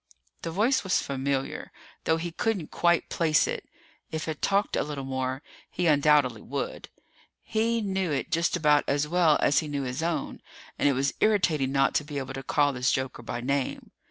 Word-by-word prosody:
The 165 - -4
voice 215 +10 +2
was 190 - +2
familiar, 135 0 -3 0.3
though 160 - +3
he 170 +1 -4
couldn't 190 -2 -2
quite 170 0 +2
place 160 -2 +2
it. - - -5 0.4
If 160 0 -4
it 155 -2 -4
talked 200 +1 +1
a - - +1
little 145 -2 -4
more, 130 +1 -3 0.3
he 180 - -2
undoubtedly 145 -6 +4
would. - - -5 0.5
He 230 +1 0
knew 190 -3 -1
it 140 - -2
just 170 +1 +1
about 150 -3 +4
as 145 +1 +1
well 165 -2 +4
as 145 - +4
he 155 - -4
knew 145 -2 -2
his 130 +3 -3
own, 165 -3 -2 0.4
and 145 - +4
it - - +2
was 135 +2 0
irritating 170 -11 +2
not 135 0 +2
to - - +1
be 145 -1 -6
able 130 -1 -4
to 135 - -5
call 145 +1 +2
this 125 0 +1
joker 130 -2 -2
by 120 +1 -5
name. 140 +1 -2
150 Hz, 190 wpm, -27 LUFS, 135-170 Hz, 0.5 s, undoubtedly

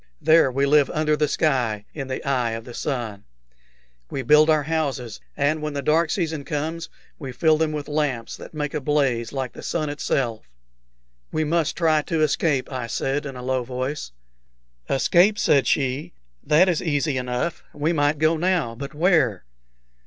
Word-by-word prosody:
There 160 -4 +5
we 135 +2 +1
live 145 -1 +4
under 155 0 +1
the 150 0 +1
sky, 125 -10 0
in 135 -4 -5
the 130 +1 -5
eye 125 -4 +1
of 115 0 -6
the 120 - -9
sun. 115 -8 -4 0.9
We 135 - -4
build 150 +4 +5
our 155 -2 +3
houses, 140 -7 -2 0.2
and 150 +2 +1
when 150 -1 -3
the 140 - -3
dark 160 +3 +2
season 160 -4 -2
comes 160 +3 -4 0.3
we 135 -4 -6
fill 155 +5 +2
them 160 -1 +1
with 150 -1 -4
lamps 145 -6 -2
that - - -11
make 150 -1 -3
a 150 - -2
blaze 130 -5 0
like 135 -3 -4
the - - -10
sun 155 -3 -2
itself." 120 - -2 0.8
"We 155 - 0
must 160 0 0
try 160 -3 +3
to 160 +1 -2
escape," 150 -2 +1
I 125 -3 -4
said, 140 +5 -2
in 135 - -7
a 125 - -8
low 130 0 0
voice. 130 - -4 0.8
"Escape!" 175 +9 +3
said 140 - +3
she. 140 +4 0 0.3
"That 160 +5 +4
is 175 -4 +1
easy 145 -3 0
enough. 125 +7 -3
We 155 +4 -1
might 145 -1 +2
go 155 +2 +2
now; 175 -8 0
but 140 +5 -8
where?" 155 - +2
145 Hz, 175 wpm, -23 LUFS, 130-155 Hz, 0.9 s, There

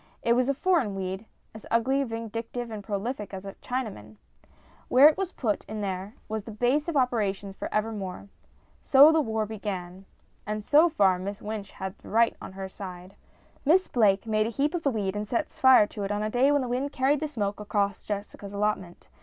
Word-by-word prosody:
It 235 - +4
was 250 +2 +2
a 275 - +1
foreign 285 - +1
weed 190 +2 -4 0.3
as 220 - -11
ugly,, 265 +4 +2
vindictive, 230 0 -5
and 210 -2 -6
prolific 205 +1 -4
as 190 +1 -8
a 195 - -6
Chinaman! 210 - -5 0.7
Where 265 +4 +8
it 305 - +4
was 385 -2 -3
put 220 - -1
in 215 0 -5
there 195 +1 -4
was 215 0 -4
its 220 -2 -8
base 265 +7 +2
of 335 -4 0
operations 205 -6 0
for - - -6
evermore. 210 -3 -3 0.5
So 285 +3 +7
the 320 -1 +3
war 220 -5 -1
began. 195 -3 -6 0.4
And 210 0 -3
so 305 +9 +5
far 195 - +3
Miss 200 +2 -5
Wynch 210 -2 -5
had 190 0 -5
right 230 +2 +2
on - - -8
her 190 0 -5
side. 185 -1 -9 0.5
Miss 360 +6 +4
Blake 210 -4 +3
made 215 -1 +1
a - - -2
heap 280 +6 0
of 350 - -1
the 285 - +1
weed 205 -5 -2
and 210 0 -3
set 230 +3 -1
fire 260 -5 +6
to 205 0 -8
it 195 - -2
on 205 0 -1
a 215 - -2
day 260 +4 +4
when 285 -2 +2
the - - -3
wind 255 +4 -2
carried 270 +2 +2
the 310 - -2
smoke 205 -8 -3
across 200 -1 -1
Jessica's 205 -1 -6
allotment. 200 -4 -2
215 Hz, 205 wpm, -27 LUFS, 200-255 Hz, 0.7 s, Where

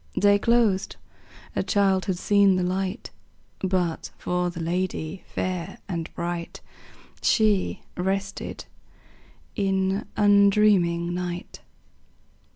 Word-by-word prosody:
Day 205 0 +5
closed; 225 -4 +2 0.6
a - - +1
child 195 -2 +2
had 185 -2 -1
seen 200 0 +4
the 185 - 0
light; 190 +4 -2 0.5
But, 180 -3 -1
for 180 0 -1
the 175 0 -7
lady 175 0 -2
fair 180 -2 -3
and 165 -3 -4
bright, 170 0 -4 0.6
She 215 -4 +2
rested 195 +2 -3 0.9
in 195 0 0
undreaming 200 -4 +4
night. 180 0 -5
190 Hz, 95 wpm, -25 LUFS, 175-200 Hz, 0.9 s, Day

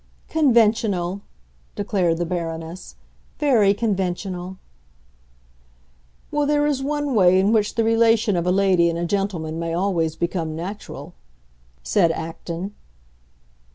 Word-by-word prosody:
"Conventional," 220 - +2 0.5
declared 190 -5 0
the 175 - -1
Baroness; 165 0 -5 0.4
"very 240 -9 +4
conventional." 190 -3 -2 1.7
"Well, 295 -1 0
there 295 0 +2
is 290 -3 0
one 290 0 -1
way 185 -4 +5
in 195 +3 +3
which 215 -2 +1
the 230 - +2
relation 225 -2 +3
of 175 0 -1
a - - +3
lady 185 -3 +3
and 170 - -2
a 170 - -2
gentleman 170 -4 -2
may 165 0 -2
always 170 -4 0
become 165 -2 -2
natural," 175 -3 -7 0.7
said 175 -5 +3
Acton. 170 +4 -5
190 Hz, 120 wpm, -22 LUFS, 170-225 Hz, 1.7 s, way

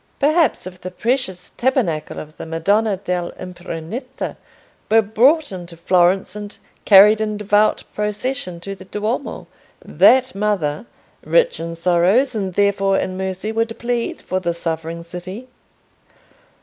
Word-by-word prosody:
Perhaps 305 - +2
if 185 -1 -10
the 185 - -5
precious 190 -2 -2
Tabernacle 235 - 0
of 155 +1 -8
the - - -7
Madonna 200 +6 +1
dell' 180 -2 -3
Impruneta 185 - -6 0.5
were 225 +1 +5
brought 255 +9 +3
into 175 -2 -8
Florence 180 +2 +2
and 205 0 -8 0.3
carried 210 +2 +7
in 215 -1 -1
devout 210 +1 +2
procession 210 -2 -2
to 195 +3 -5
the 190 -1 -12
Duomo, 215 +7 -3 0.4
that 260 0 +4
Mother, 195 -3 -1 0.4
rich - - +2
in 165 0 -5
sorrows 180 +10 +2
and 195 -5 -3
therefore 195 -1 +2
in 185 - -2
mercy, 190 +2 -3
would 225 0 -1
plead 235 0 -2
for 185 - -2
the 170 -2 -2
suffering 165 0 -4
city? 185 +8 -8
195 Hz, 135 wpm, -20 LUFS, 180-225 Hz, 0.5 s, carried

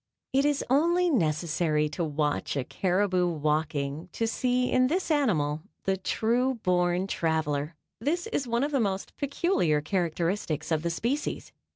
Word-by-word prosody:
It 275 +1 +3
is 290 -1 +1
only 340 +6 +3
necessary 155 - +1
to 170 +4 -3
watch 150 -2 -1
a 135 - 0
caribou 185 +3 +1
walking 150 0 -1
to 230 - -1
see 250 +2 0
in 255 0 +4
this 345 +4 -1
animal 160 - +1 0.2
the 195 - +1
true 240 +7 0
born 180 0 +2
traveler. 160 -4 -1 0.2
This 320 - -1
is 360 - -2
one 235 +2 +1
of 290 - -1
the 275 - +2
most 195 -4 -2
peculiar 280 - +1
characteristics 170 0 -1
of 155 -1 +2
the 170 - -1
species. 235 - -2
180 Hz, 150 wpm, -28 LUFS, 155-255 Hz, 0.2 s, in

